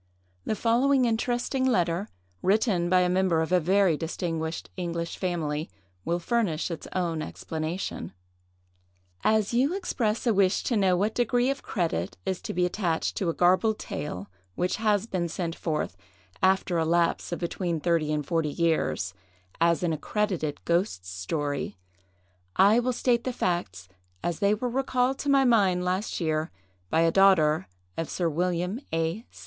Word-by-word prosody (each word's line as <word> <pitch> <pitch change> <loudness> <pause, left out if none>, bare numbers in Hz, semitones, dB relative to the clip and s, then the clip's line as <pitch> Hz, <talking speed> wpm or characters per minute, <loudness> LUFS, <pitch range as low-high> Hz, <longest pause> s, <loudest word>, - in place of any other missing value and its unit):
The - - 0
following 255 +4 +3
interesting 240 +3 0
letter, 185 -6 +1 0.3
written 195 -3 +2
by 185 0 +5
a 180 - +3
member 180 -2 +2
of 160 +2 -1
a 180 - +5
very 185 0 +3
distinguished 165 0 -3
English 170 -2 -3
family, 160 -4 -2 0.4
will 170 - +1
furnish 180 -4 0
its 165 - -6
own 170 -4 -1
explanation:— 160 +3 -4 1.1
"As 215 0 +2
you 270 +9 +2
express 235 - -1
a 235 - +3
wish 195 -1 +2
to 240 - 0
know 190 -4 +3
what 210 +4 +1
degree 245 +2 +2
of 275 - -5
credit 160 - -2
is 185 - -2
to - - -5
be 180 0 +1
attached 175 -3 -1
to 185 - 0
a - - 0
garbled 185 +5 +3
tale 100 -9 -5 0.3
which 180 +1 0
has 210 -2 +2
been 180 -6 -2
sent 165 0 -3
forth, 155 - -2 0.5
after 190 -2 +2
a - - +2
lapse 170 +2 +1
of 175 - -1
between 170 -1 -2
thirty 160 -2 +1
and 150 -1 -1
forty 165 0 0
years, 155 - 0 0.5
as 170 +1 +3
an 170 -2 +1
'accredited 160 -2 -2
ghost 170 - 0
story,' 140 - -3 0.8
I 205 +4 +6
will 250 +1 0
state 240 -1 +1
the 255 - -1
facts 95 - -2 0.4
as 175 -2 -2
they 200 +1 +3
were 245 +4 -2
recalled 255 +1 0
to 285 - -2
my 275 -1 +5
mind 195 -7 +3
last 185 +3 -1
year 155 -2 0 0.4
by 160 - +3
a 165 0 +4
daughter 165 - +4 0.3
of 165 - -2
Sir 175 -2 0
William 180 - -1
A. 165 +7 -1
180 Hz, 160 wpm, -27 LUFS, 165-215 Hz, 1.1 s, I